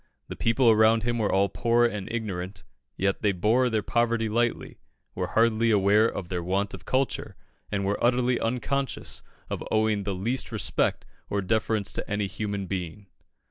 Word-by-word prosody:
The -, -, -5 dB
people 115 Hz, +1 st, +3 dB
around 110 Hz, 0 st, +4 dB
him 120 Hz, 0 st, -1 dB
were 105 Hz, -, +1 dB
all 100 Hz, +1 st, +3 dB
poor 120 Hz, +4 st, +2 dB
and 105 Hz, -5 st, -3 dB
ignorant, 95 Hz, -5 st, -4 dB, 0.3 s
yet 95 Hz, 0 st, 0 dB
they 105 Hz, -, +3 dB
bore 110 Hz, +7 st, +2 dB
their 110 Hz, -2 st, 0 dB
poverty 115 Hz, -1 st, +1 dB
lightly, 120 Hz, +2 st, -1 dB, 0.3 s
were -, -, -2 dB
hardly 115 Hz, 0 st, +2 dB
aware 105 Hz, +1 st, +4 dB
of 90 Hz, -, -6 dB
their 90 Hz, -1 st, -3 dB
want 95 Hz, +4 st, -1 dB
of -, -, -9 dB
culture, 130 Hz, +1 st, -1 dB, 0.4 s
and 100 Hz, -1 st, -1 dB
were 100 Hz, +1 st, -1 dB
utterly 125 Hz, 0 st, +2 dB
unconscious 130 Hz, +3 st, -2 dB, 0.3 s
of -, -, -4 dB
owing 110 Hz, -1 st, +2 dB
the 100 Hz, -1 st, -3 dB
least 115 Hz, +8 st, -2 dB
respect -, -, 0 dB, 0.2 s
or 100 Hz, -, 0 dB
deference 110 Hz, +1 st, +1 dB
to -, -, -5 dB
any 105 Hz, 0 st, 0 dB
human 100 Hz, 0 st, -4 dB
being. 95 Hz, +1 st, -5 dB
110 Hz, 170 wpm, -26 LUFS, 100-115 Hz, 0.4 s, around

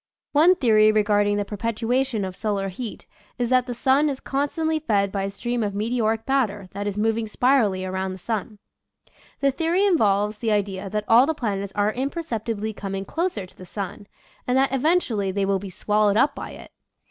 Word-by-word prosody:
One 325 Hz, +5 st, +5 dB
theory 215 Hz, -, +4 dB
regarding 205 Hz, -1 st, +2 dB
the 205 Hz, -, -1 dB
perpetuation 230 Hz, +2 st, -1 dB
of 185 Hz, -1 st, -6 dB
solar 200 Hz, -2 st, -2 dB
heat 220 Hz, +4 st, -7 dB, 0.3 s
is 245 Hz, 0 st, -1 dB
that 255 Hz, 0 st, +3 dB
the 245 Hz, -, -4 dB
sun 270 Hz, +5 st, +3 dB
is 270 Hz, -2 st, -4 dB
constantly 310 Hz, +3 st, -1 dB
fed 205 Hz, -9 st, +1 dB
by 195 Hz, -1 st, -2 dB
a -, -, -2 dB
stream 240 Hz, +4 st, -3 dB
of 205 Hz, -2 st, -2 dB
meteoric 225 Hz, +1 st, 0 dB
matter 215 Hz, -8 st, 0 dB
that 205 Hz, +1 st, -4 dB
is 205 Hz, 0 st, -3 dB
moving 225 Hz, +1 st, 0 dB
spirally 215 Hz, -6 st, +2 dB
around 190 Hz, 0 st, -3 dB
the -, -, -8 dB
sun. 215 Hz, +1 st, -4 dB, 0.8 s
The 275 Hz, 0 st, +3 dB
theory 335 Hz, +8 st, +1 dB
involves 210 Hz, -, +2 dB
the 225 Hz, -2 st, 0 dB
idea 200 Hz, -2 st, -1 dB
that 210 Hz, +1 st, -2 dB
all 240 Hz, +4 st, +6 dB
the 320 Hz, -, 0 dB
planets 200 Hz, -7 st, -3 dB
are 205 Hz, +1 st, +1 dB
imperceptibly 235 Hz, -6 st, -3 dB
coming 195 Hz, -1 st, -5 dB
closer 330 Hz, -, -2 dB
to 180 Hz, -, -19 dB
the -, -, -12 dB
sun, 200 Hz, +2 st, -6 dB, 0.4 s
and 250 Hz, +1 st, +2 dB
that 270 Hz, 0 st, +2 dB
eventually 260 Hz, -, +1 dB
they 195 Hz, +1 st, 0 dB
will 195 Hz, 0 st, +1 dB
be 200 Hz, 0 st, -7 dB
swallowed 210 Hz, +2 st, +1 dB
up 275 Hz, +4 st, +3 dB
by -, -, -7 dB
it. -, -, -12 dB
215 Hz, 190 wpm, -24 LUFS, 200-260 Hz, 0.8 s, all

